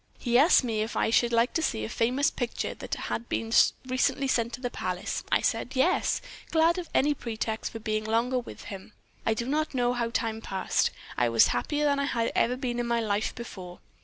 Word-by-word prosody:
He 240 Hz, -2 st, -1 dB
asked 300 Hz, 0 st, +6 dB
me 225 Hz, -3 st, -1 dB
if 220 Hz, +2 st, -3 dB
I -, -, +1 dB
should 235 Hz, +1 st, +3 dB
like 230 Hz, +1 st, +2 dB
to 325 Hz, -, +1 dB
see 110 Hz, -, -1 dB
a -, -, -4 dB
famous 250 Hz, -, +1 dB
picture 245 Hz, -2 st, -3 dB
that -, -, -5 dB
had 235 Hz, -, -4 dB
been 225 Hz, 0 st, -2 dB, 0.3 s
recently 255 Hz, +2 st, +1 dB
sent 235 Hz, -3 st, +1 dB
to -, -, -5 dB
the 245 Hz, -1 st, -3 dB
palace. 180 Hz, -4 st, -3 dB
I -, -, +4 dB
said 260 Hz, -, -1 dB
'Yes,' 345 Hz, +8 st, +2 dB, 0.3 s
glad 330 Hz, +2 st, +3 dB
of 345 Hz, -, -7 dB
any 295 Hz, +2 st, +3 dB
pretext 225 Hz, -4 st, -4 dB
for -, -, -6 dB
being 215 Hz, -1 st, -2 dB
longer 235 Hz, +3 st, +1 dB
with 240 Hz, -, -9 dB
him. 195 Hz, +1 st, -9 dB, 0.3 s
I 225 Hz, -, +3 dB
do 235 Hz, +1 st, -3 dB
not 300 Hz, +2 st, -1 dB
know 245 Hz, -1 st, +2 dB
how 235 Hz, -1 st, -1 dB
time 225 Hz, -2 st, -2 dB
passed. 190 Hz, -3 st, 0 dB, 0.3 s
I 120 Hz, -, +3 dB
was 115 Hz, -1 st, +5 dB
happier 295 Hz, -, 0 dB
than 285 Hz, -1 st, +2 dB
I 280 Hz, -, +1 dB
had 230 Hz, -4 st, 0 dB
ever 250 Hz, +2 st, +2 dB
been 245 Hz, -2 st, -2 dB
in 240 Hz, -, -1 dB
my 235 Hz, 0 st, +1 dB
life 215 Hz, -1 st, -1 dB
before. 185 Hz, -7 st, -8 dB
235 Hz, 220 wpm, -28 LUFS, 220-260 Hz, 0.3 s, asked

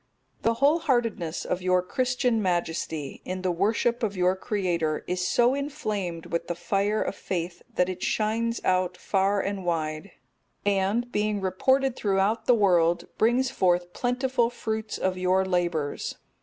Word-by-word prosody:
_ -, -, -37 dB
The 230 Hz, 0 st, +2 dB
wholeheartedness 240 Hz, -, +1 dB
of 180 Hz, -, -2 dB
your 185 Hz, 0 st, +2 dB
Christian 250 Hz, +2 st, 0 dB
Majesty, 165 Hz, -5 st, -2 dB
in 185 Hz, 0 st, -5 dB
the 185 Hz, -, +1 dB
worship 225 Hz, +7 st, +1 dB
of 205 Hz, -4 st, -1 dB
your 180 Hz, +1 st, +3 dB
Creator, 175 Hz, -6 st, -1 dB
is 180 Hz, 0 st, -1 dB
so 245 Hz, +1 st, +3 dB
inflamed 215 Hz, -, -3 dB
with 170 Hz, -, -3 dB
the 175 Hz, -, -2 dB
fire 200 Hz, +4 st, 0 dB
of -, -, -3 dB
faith, 175 Hz, -3 st, -4 dB
that 180 Hz, -, +3 dB
it 185 Hz, -1 st, -5 dB
shines 230 Hz, +2 st, 0 dB
out 185 Hz, -1 st, +1 dB
far 195 Hz, 0 st, +1 dB
and 200 Hz, -1 st, -3 dB
wide, 160 Hz, +1 st, -2 dB, 0.6 s
and, 205 Hz, +5 st, +1 dB
being 210 Hz, -1 st, 0 dB
reported 260 Hz, +8 st, +1 dB
throughout 200 Hz, +1 st, 0 dB
the 245 Hz, -, +6 dB
world, 175 Hz, -5 st, +3 dB
brings 240 Hz, +3 st, +3 dB
forth 175 Hz, -1 st, +1 dB
plentiful 250 Hz, -1 st, +1 dB
fruits 220 Hz, -2 st, -4 dB
of 185 Hz, -1 st, -1 dB
your 185 Hz, +1 st, +2 dB
labours. 175 Hz, -5 st, -1 dB
195 Hz, 150 wpm, -26 LUFS, 180-230 Hz, 0.6 s, the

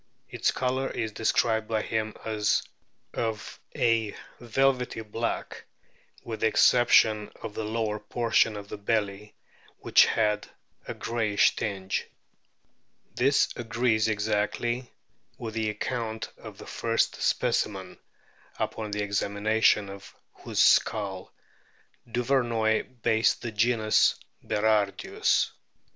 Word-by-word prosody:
Its -, -, 0 dB
colour 130 Hz, +1 st, -1 dB
is 110 Hz, -2 st, -3 dB
described 110 Hz, 0 st, +1 dB
by 110 Hz, -1 st, -1 dB
him 110 Hz, -1 st, -2 dB
as 105 Hz, -2 st, +1 dB, 0.5 s
of 110 Hz, -2 st, -4 dB, 0.2 s
a 115 Hz, -3 st, +1 dB, 0.2 s
velvety 125 Hz, 0 st, 0 dB
black, 115 Hz, +2 st, -4 dB, 0.6 s
with 110 Hz, -2 st, -6 dB
the 110 Hz, -, +3 dB
exception 110 Hz, -2 st, +4 dB
of 105 Hz, -, -5 dB
the 110 Hz, -, -4 dB
lower 110 Hz, -1 st, -2 dB
portion 110 Hz, 0 st, +1 dB
of 100 Hz, 0 st, -8 dB
the 100 Hz, -, -8 dB
belly, 105 Hz, -1 st, -2 dB, 0.5 s
which -, -, +5 dB
had 105 Hz, -2 st, 0 dB, 0.4 s
a -, -, -4 dB
greyish 110 Hz, -3 st, +1 dB
tinge. 95 Hz, -2 st, -3 dB, 1.1 s
This 140 Hz, +3 st, +3 dB
agrees 115 Hz, -2 st, +1 dB
exactly 110 Hz, +3 st, -1 dB, 0.5 s
with 115 Hz, -2 st, -6 dB
the 110 Hz, -1 st, -1 dB
account 110 Hz, +1 st, -4 dB
of -, -, -11 dB
the -, -, -11 dB
first -, -, -1 dB
specimen, 95 Hz, -3 st, -1 dB, 0.6 s
upon 110 Hz, -1 st, -3 dB
the 105 Hz, 0 st, -2 dB
examination 100 Hz, +1 st, +1 dB
of 100 Hz, 0 st, -11 dB, 0.2 s
whose -, -, -5 dB
skull 100 Hz, -4 st, +2 dB, 0.8 s
Duvernoy 120 Hz, -1 st, 0 dB
based 110 Hz, 0 st, +2 dB
the 120 Hz, -, -3 dB
genus 110 Hz, 0 st, +3 dB, 0.3 s
Berardius. 105 Hz, -2 st, +1 dB
110 Hz, 110 wpm, -27 LUFS, 105-115 Hz, 1.1 s, which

